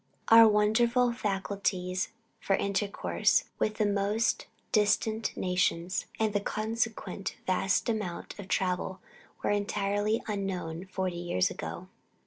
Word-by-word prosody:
Our 225 0 +10
wonderful 235 +4 +3
facilities 195 -4 -1 0.3
for 195 - +1
intercourse 200 +1 +1 0.2
with 215 - 0
the 215 - +1
most 205 +3 +1 0.2
distant 215 0 +2
nations, 180 -1 0
and 220 -2 +1
the 205 - +2
consequent 220 -1 -3
vast 185 0 +1
amount 210 -5 -3
of 200 - -7
travel, 185 0 -1 0.4
were - - +1
entirely 205 +1 0
unknown 190 -5 -3
forty 185 -2 -2
years 175 - 0
ago. - - -6
200 Hz, 115 wpm, -29 LUFS, 185-215 Hz, 0.4 s, Our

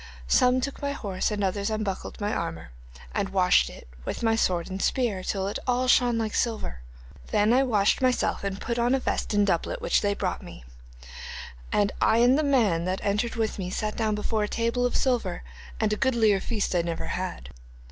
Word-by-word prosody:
Some 250 - +4
took 280 +2 -4
my 280 0 -1
horse, 195 -8 -2
and 210 -2 -2
others 200 +2 0
unbuckled 215 -3 -3
my 210 0 -1
armour, 80 -7 -4 0.4
and - - -1
washed - - +3
it, - - -12 0.2
with - - -4
my 225 -1 +3
sword 180 -6 +1
and 190 0 -5
spear, 230 -8 0
till 195 0 -1
it 200 - -3
all 250 +1 +1
shone 245 -2 +4
like 220 -2 -2
silver. 220 - -1 0.5
Then 210 +3 +3
I 260 - +5
washed 215 -6 +2
myself 255 -5 +1
and 200 0 -3
put 235 0 -2
on 240 +2 +3
a - - 0
vest - - -2
and 205 0 +4
doublet 200 - 0
which 485 - +2
they 205 -1 +1
brought - - -2
me, - - -11 1.1
and 205 -1 +2
I 220 - +4
and 245 +2 +5
the 310 - +2
man 220 - +2
that 185 +1 -2
entered 210 +4 0
with 220 -2 -1
me 180 -1 -3
sat 215 +3 -2
down 220 -2 0
before 215 +1 -1
a - - -7
table 235 +2 0
of - - -1
silver, 235 -9 0 0.4
and 215 -1 +1
a - - -1
goodlier 225 -6 +3
feast 210 -1 -2
I 175 - +3
never 170 -1 -4
had. - - -4
215 Hz, 205 wpm, -26 LUFS, 195-245 Hz, 1.1 s, I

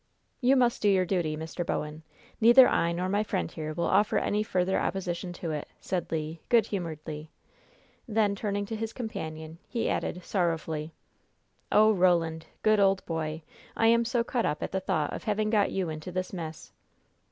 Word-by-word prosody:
"You 260 +2 +4
must 245 -2 +2
do 210 - +4
your 190 -2 +3
duty, 170 -5 -1
Mr. 160 +2 -4
Bowen. 150 -1 -3 0.4
Neither 240 +3 +8
I 170 - +2
nor 180 +2 -1
my 200 +2 +1
friend 200 -5 -2
here 155 -1 -5
will 170 +2 -2
offer 205 +2 +3
any 210 +1 +1
further 190 -3 0
opposition 180 -2 -2
to 170 -2 -4
it," 150 -1 -4
said 180 -3 -3
Le, 160 0 -2
good 235 -4 +5
humoredly. 155 -6 -5 0.8
Then, 215 -2 +2
turning 205 0 -2
to 225 - -5
his 225 0 -4
companion, 160 -9 -6
he 235 -2 -1
added, 180 - -2
sorrowfully: 165 -4 -2 0.8
"Oh, 215 +1 +6
Roland, 170 -4 +2 0.2
good, 215 -1 +4
old 195 -1 +3
boy, 160 -1 -3 0.3
I 225 - +4
am 235 0 +4
so 235 0 0
cut 240 0 -1
up 150 - -1
at - - -4
the 190 - 0
thought 155 -5 -1
of - - -6
having 215 0 0
got 210 -3 +3
you 185 -3 -1
into 155 +3 -6
this 185 +2 -3
mess!" 160 -3 -7
185 Hz, 180 wpm, -28 LUFS, 160-215 Hz, 0.8 s, Neither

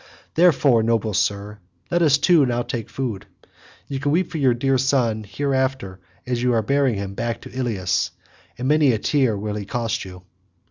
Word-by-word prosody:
Therefore, 145 -8 +4
noble 110 -1 0
sir, 105 +2 -1 0.3
let 175 0 +2
us 145 -4 +5
two 165 +1 +4
now 120 -2 0
take 115 -3 -5
food; 110 -7 -4 0.6
you 135 -1 -4
can 145 +1 0
weep 175 +3 +1
for 160 - -3
your 130 -4 +3
dear 135 +2 +1
son 120 -5 +1
hereafter 130 -8 -2 0.3
as 125 -1 -2
you 125 0 +2
are 115 -1 +1
bearing 140 0 +1
him 100 -1 -5
back 115 +2 -3
to - - -11
Ilius—and 95 -1 -3
many 150 -3 +4
a - - +1
tear 125 -1 +1
will 105 +1 -4
he 105 -1 -4
cost 115 +1 -2
you." 90 -1 -11
120 Hz, 180 wpm, -22 LUFS, 105-140 Hz, 0.6 s, us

